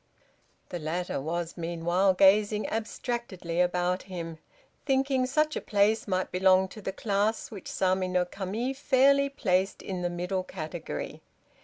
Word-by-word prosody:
The 175 - -4
latter 170 0 -2
was 165 +3 -3
meanwhile 175 +3 +1
gazing 205 +3 +4
abstractedly 215 -6 -2
about 180 +1 +1
him, 165 -4 -7 0.4
thinking 270 -2 +1
such 305 +3 +1
a - - -2
place 210 +2 +2
might 185 -1 -1
belong 190 0 +4
to 215 - -10
the 195 - -3
class 205 +2 -1
which 200 -4 -8
Sama 185 0 +1
no 180 -1 +1
Kami 205 +8 -3
fairly 280 +1 +4
placed 190 -8 0
in 185 -2 -4
the 175 - 0
middle 180 +2 -2
category. 160 - -6
190 Hz, 140 wpm, -28 LUFS, 180-220 Hz, 0.4 s, gazing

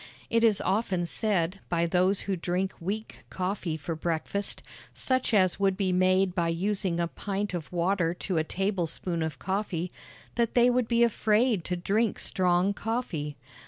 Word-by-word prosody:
It 230 0 +3
is 220 -3 +4
often 190 -3 0
said 190 -1 0
by 170 -1 +1
those 185 +3 +2
who 195 - -1
drink 180 +2 -1
weak 205 +6 -5
coffee 185 -3 -2
for 160 +2 -4
breakfast, 170 +5 -2 0.3
such 260 -2 +1
as 190 -4 +3
would 195 -1 +2
be 190 -2 +1
made 185 0 +3
by 170 -2 +1
using 185 +1 0
a 170 - +1
pint 200 +3 -3
of 170 -4 -5
water 175 -1 +1
to 180 -1 -1
a - - +1
tablespoonful 180 -2 -2
of 160 -3 -3
coffee, 185 -2 -2 0.5
that 235 -1 +1
they 245 0 +6
would 245 -2 +1
be 235 0 +3
afraid 220 -2 +2
to 180 - -1
drink 205 +5 +1
strong 180 +1 +2
coffee. 195 - -3
190 Hz, 160 wpm, -28 LUFS, 175-210 Hz, 0.5 s, they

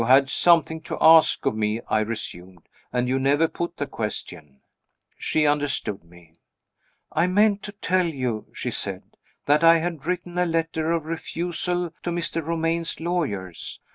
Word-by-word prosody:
"You 115 - 0
had 135 +1 +5
something 165 -2 +3
to - - -3
ask 160 0 +6
of - - +1
me," 110 +1 0
I 110 - +2
resumed, 95 -5 -5 0.2
"and 125 0 0
you 130 +1 +1
never 145 +4 +3
put 170 +1 -5
the 145 - -2
question." 95 - -6 0.5
She 155 -1 0
understood 145 - 0
me. 85 -1 -20 0.7
"I 175 - +2
meant 205 +2 +3
to 205 - -7
tell 185 -3 0
you," 130 -8 -3
she - - -4
said, - - -4 0.4
"that 150 +2 +3
I 165 0 +8
had 165 -3 -4
written 180 0 -2
a 180 - +2
letter 165 -1 -1
of 165 -2 -1
refusal 175 +1 -3
to - - -3
Mr. 170 -1 -2
Romayne's 165 +1 -1
lawyers. 145 - -3
160 Hz, 160 wpm, -24 LUFS, 125-170 Hz, 0.7 s, I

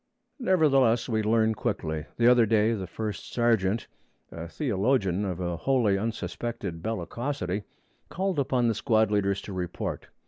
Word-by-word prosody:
Nevertheless, 135 - +3
we 110 -3 0
learn 110 +1 +2
quickly. 80 -10 -3
The 115 - +2
other 120 -2 +6
day 110 +1 +3
the 95 -4 -4
first 105 +1 -5
sergeant, 115 -3 +1 0.5
a 85 0 -7
theologian 105 - 0
of 90 -3 -3
a 85 -2 -2
wholly 115 0 +2
unsuspected 110 -4 -4
bellicosity, 110 - -3 0.4
called 190 -3 -1
upon 125 -3 +1
the 115 - +2
squad 110 -2 +2
leaders 100 -1 +1
to 100 - -7
report. 90 -2 -4
110 Hz, 140 wpm, -27 LUFS, 95-120 Hz, 0.5 s, other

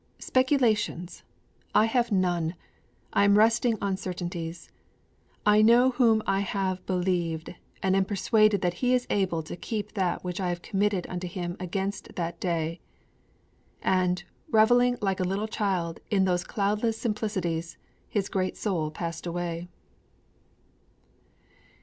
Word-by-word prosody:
'Speculations! 235 - +1 0.5
I 215 - +6
have 235 0 +1
none! 175 -3 +1 0.6
I 200 - +4
am 200 0 +5
resting 225 +1 +4
on 195 -1 0
certainties. 175 -2 -5 0.8
_I 210 +1 +6
know 240 +3 +6
whom 230 -4 +3
I 195 - +1
have 190 -2 -2
believed 175 -3 -1 0.3
and 190 0 +3
am 195 0 +3
persuaded 210 +1 +3
that 175 -1 +1
He 250 0 +4
is 250 0 0
able 180 -5 0
to 155 - -7
keep 210 +3 -4
that 185 -4 -1
which 180 +1 -4
I 180 - 0
have 175 0 -4
committed 200 -2 0
unto 180 0 -4
Him 175 0 -4
against 190 +2 -4
that 170 -1 -3
day!_' 165 -2 -1 1.0
And, 180 -1 +1 0.3
reveling 245 +3 +4
like 195 -1 0
a - - +1
little 195 +4 -1
child 185 -6 -1
in 195 -2 +3
those 180 -1 +1
cloudless 210 +2 0
simplicities, 185 -8 -2 0.3
his 200 -3 -1
great 185 -1 -2
soul 170 -7 -1
passed 165 +2 -5
away. 170 0 -3
190 Hz, 135 wpm, -27 LUFS, 175-215 Hz, 1.0 s, I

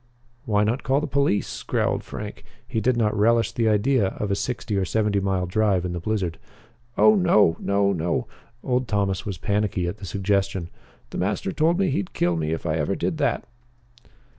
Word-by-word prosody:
"Why 105 -4 +2
not 115 +5 0
call 135 +2 +1
the 150 - -2
police?" 140 -7 0
growled - - 0
Frank. - - -7 0.2
He 120 -4 -1
did 120 +2 +2
not 105 -2 +1
relish 115 +2 +3
the 115 -2 +1
idea 110 +1 +2
of 100 +1 -3
a - - +2
sixty 110 -1 -3
or 95 - +1
seventy 105 +1 +1
mile 95 -2 0
drive 95 -1 +1
in 90 - -3
the 85 - -3
blizzard. 90 -3 -2 0.6
"Oh 215 - +7
no 140 - +4
no 100 0 +1
no!" 85 -1 -1 0.4
Old 125 -1 0
Thomas 100 -3 -1
was 100 -4 -3
panicky 100 -1 0
at 90 - -4
the 100 - -9
suggestion. 95 -2 -1 0.4
"The - - -4
master 95 - -1
told 165 - +2
me 195 -5 +1
he'd 100 -8 -2
kill 85 0 +1
me 80 -1 -1
if 80 - -3
I 80 -1 0
ever 75 -2 0
did - - -2
that." - - 0
105 Hz, 190 wpm, -24 LUFS, 95-115 Hz, 0.6 s, Oh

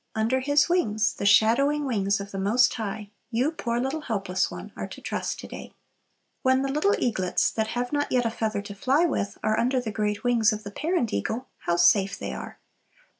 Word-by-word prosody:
Under 225 +4 +1
His 285 +2 +3
wings, 215 - +1
the 200 - -2
shadowing 275 +8 +4
wings 200 -5 0
of 200 0 -7
the 195 - -4
Most 215 +6 +3
High, 210 -2 -5 0.2
you, 250 +6 +1
poor 235 -7 -2
little 270 +5 -2
helpless 195 -8 -1
one, - - -8
are - - -5
to - - -10
trust - - -3
to - - -9
day. - - -9 0.7
When 260 +1 +3
the 275 - -1
little 305 +9 +2
eaglets, 190 -7 0
that 220 -1 -1
have 245 +3 -2
not 290 0 0
yet 245 -1 +2
a 230 - +1
feather 215 -3 -2
to 205 - -8
fly 270 - +2
with, 205 -11 -2
are 215 0 +1
under 255 +2 +2
the 235 -3 -4
great 210 -1 -2
wings 235 -3 +3
of 215 0 -4
the 205 - -7
parent 305 - -1
eagle, 220 - -3 0.2
how 170 - +3
safe 195 +3 +4
they - - -5
are! - - -8
225 Hz, 210 wpm, -26 LUFS, 205-260 Hz, 0.7 s, shadowing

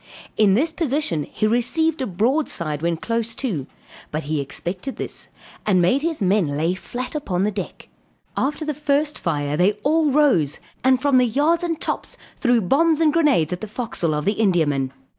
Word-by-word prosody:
In 200 -3 +4
this 315 +8 +1
position 285 - -1
he - - -1
received 285 +8 +1
a 260 - -1
broadside 185 - 0
when 170 0 0
close 230 +4 -2
too; 175 - -3 0.4
but 155 +1 -3
he 150 +1 -2
expected 180 - -5
this, - - -5 0.4
and 190 -4 +3
made 180 +11 +3
his 320 -7 -2
men 180 -7 +1
lay 165 +4 +1
flat 245 +6 -6
upon 195 - -1
the 210 - +1
deck. 195 -2 -6 0.5
After 300 +3 -1
the 300 - -1
first 295 +1 0
fire 145 -3 -1
they 180 +6 +3
all 310 +1 +3
rose, 260 - +2 0.2
and 260 0 +4
from 275 -1 +3
the 250 - +3
yards 305 +8 +2
and 335 -2 -2
tops, - - -4 0.2
threw 245 -4 +2
bombs 310 - +3
and 310 -2 +3
grenades 280 - +3
into 180 - -5
the 215 - -5
forecastle 215 -9 -1
of 150 - -2
the 210 +2 +1
Indiaman. 150 -9 +1
230 Hz, 180 wpm, -22 LUFS, -, 0.5 s, In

